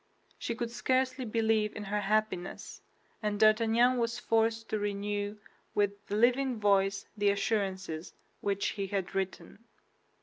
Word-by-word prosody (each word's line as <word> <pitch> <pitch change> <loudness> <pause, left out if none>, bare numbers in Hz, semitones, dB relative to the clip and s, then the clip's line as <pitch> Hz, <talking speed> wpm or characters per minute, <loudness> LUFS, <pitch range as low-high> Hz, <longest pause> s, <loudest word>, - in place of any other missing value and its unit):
She 235 - -3
could 235 0 -3
scarcely 255 +1 0
believe 220 -1 +1
in 210 - -5
her 205 +1 -1
happiness; 205 -3 -1 0.4
and 210 -1 -1
D'Artagnan 225 +3 +4
was 230 0 0
forced 225 -1 +1
to 215 - -1
renew 205 0 -2 0.4
with 205 0 0
the 205 - -2
living 250 +2 +3
voice 195 -1 +2
the 205 -1 +2
assurances 190 -5 -1 0.2
which 200 0 0
he 200 -2 -3
had 190 -1 -2
written. 195 +3 -4
210 Hz, 135 wpm, -31 LUFS, 200-230 Hz, 0.4 s, D'Artagnan